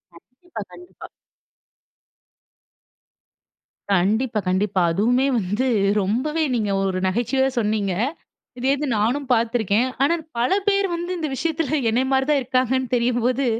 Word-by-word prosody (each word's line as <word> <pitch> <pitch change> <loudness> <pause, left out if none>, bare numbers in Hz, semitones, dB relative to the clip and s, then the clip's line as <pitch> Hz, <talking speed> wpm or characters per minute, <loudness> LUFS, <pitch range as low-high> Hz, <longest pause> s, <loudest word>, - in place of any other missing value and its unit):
கண்டிப்பா 255 - -11
கண்டிப்பா. 355 0 -13 2.8
கண்டிப்பா 215 +5 +1
கண்டிப்பா. 190 0 +1
அதுவுமே 240 +9 +2
வந்து 205 +7 -1 0.3
ரொம்பவே 275 +11 -1
நீங்க 210 -4 -1
ஒரு 190 -1 -1
நகைச்சுவையா 255 +6 +1
சொன்னீங்க. 210 -3 0 0.6
இதே 260 +2 +1
இது 295 +1 -3
நானும் 245 +6 0
பாத்துருக்கேன். 230 0 +2 0.2
ஆனா 335 +4 +3 0.2
பல 240 +6 +1 0.2
பேர் 395 -1 +3
வந்து 345 +1 -4
இந்த 315 -2 -2
விஷயத்தில 315 -1 -1
என்னய 245 +4 +1
மாரி 265 0 +2
தான் 295 - +3
இருக்காங்கன்னு 255 0 0
தெரியும்போது 245 +2 +1
245 Hz, 115 wpm, -22 LUFS, 210-275 Hz, 2.8 s, ஆனா